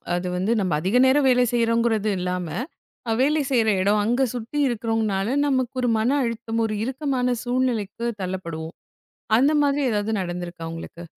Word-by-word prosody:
அது 180 +1 -2
வந்து, 190 +5 0
நம்ம 185 -4 -1
அதிக 190 +8 0
நேரம் 270 +1 +4
வேலை 250 0 +4
செய்யுறோங்குறது 230 -2 +1
இல்லாம, 180 -1 -2 0.7
வேலை 295 +2 +3
செய்யுற 235 -4 +2
இடம் 205 +2 +2
அங்க 240 +5 +1
சுத்தி 240 +5 -5
இருக்கறவங்குனால 225 -2 -1
நமக்கு 260 -3 0
ஒரு 245 - +1
மன 220 - +1 0.2
அழுத்தம், 230 -1 -3
ஒரு 215 - -3
இறுக்கமான 260 -2 -1
சூழ்நிலைக்குத் 235 -3 -1
தள்ளப்படுவோம். 170 -3 -5 0.6
அந்த 275 +5 +4
மாதிரி 285 0 +2
எதாவது 210 0 -1
நடந்திருக்கா 175 -2 -5
உங்களுக்கு? 165 +1 -8
225 Hz, 145 wpm, -23 LUFS, 190-250 Hz, 0.7 s, நேரம்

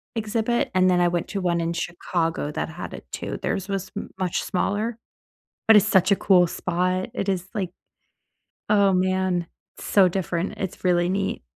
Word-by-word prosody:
exhibit, 225 +2 0
and 185 0 +5
then 180 -1 +3
I 175 - +4
went 175 -1 -2
to 200 - -3
one 170 -2 +1
in 165 +1 -1
Chicago 170 -3 -2
that 150 - -3
had 175 +2 -7
it - - -9
too. - - -4
Theirs 190 0 -2
was 195 -1 -3
m 205 - -5
much 180 -2 -1
smaller, 215 +5 -1 0.7
but 220 - +8
it's 205 - +5
such 190 -2 +4
a - - +6
cool 180 -3 +4
spot. 185 +4 -1
It 200 - -3
is, 185 -1 -1
like, 185 -4 -2 1.0
oh, 200 -2 +5
man, 185 -1 +1 0.3
so 190 -3 +4
different. 180 -1 -2
It's 190 -1 -5
really 175 -1 +3
neat. 195 +1 -1
185 Hz, 175 wpm, -24 LUFS, 175-200 Hz, 1.0 s, but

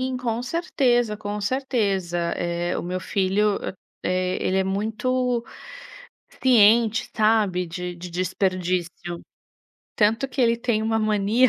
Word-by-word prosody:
Sim, 255 0 -1
com 240 -1 -2
certeza, 245 -7 +1
com 210 0 -4
certeza. 200 -7 0 0.2
Eh, 175 0 -2
o - - -3
meu 180 +1 -3
filho, 200 +3 +1 0.4
eh, 185 0 0
ele 190 +1 +1
é 190 - +2
muito 235 +5 -1 1.0
ciente, 230 -2 +5
sabe, 210 -5 +2
de 180 +1 -5
de 175 0 -8
desperdício. 185 -1 -1 1.1
Tanto 225 +5 +2
que 260 - -3
ele 235 -1 +4
tem 230 -2 0
uma 225 0 +1
mania, 215 +3 +3
210 Hz, 125 wpm, -24 LUFS, 185-235 Hz, 1.1 s, ciente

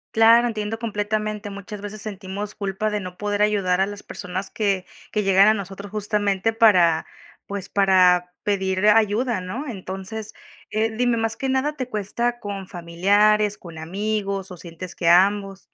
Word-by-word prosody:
Claro, 230 +2 +6
entiendo 220 -1 -3
completamente. 215 -1 -2
Muchas 200 +1 -8
veces 205 0 -7
sentimos 200 0 -6
culpa 200 +1 -2
de 210 -1 -2
no 180 -1 -8
poder 205 0 -1
ayudar 195 -3 +2
a - - +4
las 205 0 -7
personas 185 +1 -6
que 200 -4 -1 0.3
que 210 - 0
llegan 195 +2 +6
a - - +5
nosotros 200 0 -7
justamente 210 0 0
para, 180 -8 +4 0.4
pues, 200 -2 -5
para 180 -2 +4
pedir 190 -1 0
ayuda, 220 +1 +3
¿no? 235 +11 -5
Entonces, 195 +1 -6 0.4
eh, 220 +1 0
dime, 245 0 +1
más 225 0 -1
que 270 - -3
nada, 265 +3 +1
¿te 255 -3 -5
cuesta 235 +3 -2
con 200 -3 -6
familiares, 205 +5 +2
con 170 -3 -11
amigos, 195 +3 -3
o - - -7
sientes 170 +1 -9
que 165 - +1
ambos? 195 +2 +3
205 Hz, 160 wpm, -23 LUFS, 190-215 Hz, 0.4 s, Claro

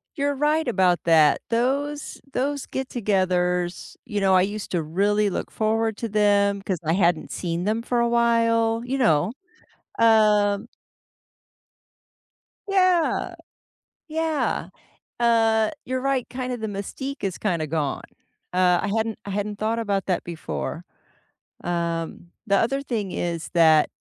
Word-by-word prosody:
You're 285 -1 0
right 300 +1 +1
about 185 -7 +2
that. 160 -3 +5
Those 275 +5 -1
those 280 +1 -2
get-togethers, 185 -8 -1
you 205 -2 -3
know, 190 -1 +4
I 185 - +5
used 205 +1 -4
to 170 -3 0
really 205 +6 +1
look - - -4
forward 220 0 0
to 230 - -4
them, 200 -1 +2
'cause 190 -3 -2
I 160 - +2
hadn't 175 -3 +1
seen 170 0 -3
them 220 +3 0
for 240 0 -1
a 235 - +2
while, 230 -1 +2
you 270 +2 -2
know? 165 - +3 0.7
Um 210 -1 +4 2.0
Yeah, 370 -4 +2 0.7
yeah. 320 -1 -1 0.5
Uh, 225 -1 +3
you're 255 0 -2
right, 270 -2 0
kind 255 0 -4
of 235 - -6
the 220 - -2
mystique 210 +8 -6
is 190 -3 -2
kinda 170 -7 -1
gone. 150 -3 -2 0.5
Uh, 180 -1 +3
I - - -2
hadn't 220 -1 -1
I 200 - -5
hadn't 205 +1 -3
thought 225 +2 0
about 200 -3 -1
that 185 - -1
before. 75 - -5 0.8
Um, 170 -1 -3 0.2
the 200 -1 +3
other 275 +7 +1
thing 215 -8 -3
is 170 -2 -3
that 160 -2 +5
210 Hz, 135 wpm, -24 LUFS, 180-235 Hz, 2.0 s, that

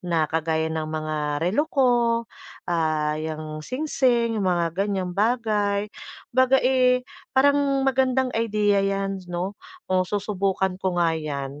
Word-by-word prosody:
na 170 -3 0
kagaya 160 0 -1
ng 155 -1 -3
mga 155 0 -3 0.3
relo 290 - +1
ko, 265 -5 +3 0.7
ah, 155 -3 0
yang 155 -1 -5
singsing, 245 - 0
yung 190 - +1
mga 170 -2 0
ganyang 190 -1 -2
bagay. 210 -1 0 0.4
'Baga, 260 +1 +4
eh, 250 -1 +3 0.3
parang 280 0 +3
magandang 260 -1 +1
idea 210 -3 +1
'yan 195 0 -1
'no, 175 +2 -3 0.4
oh 185 -1 +2
susubukan 195 -2 -1
ko 185 -2 -1
nga 170 -2 +2
'yan. 145 -3 -4
195 Hz, 130 wpm, -24 LUFS, 160-250 Hz, 0.7 s, Baga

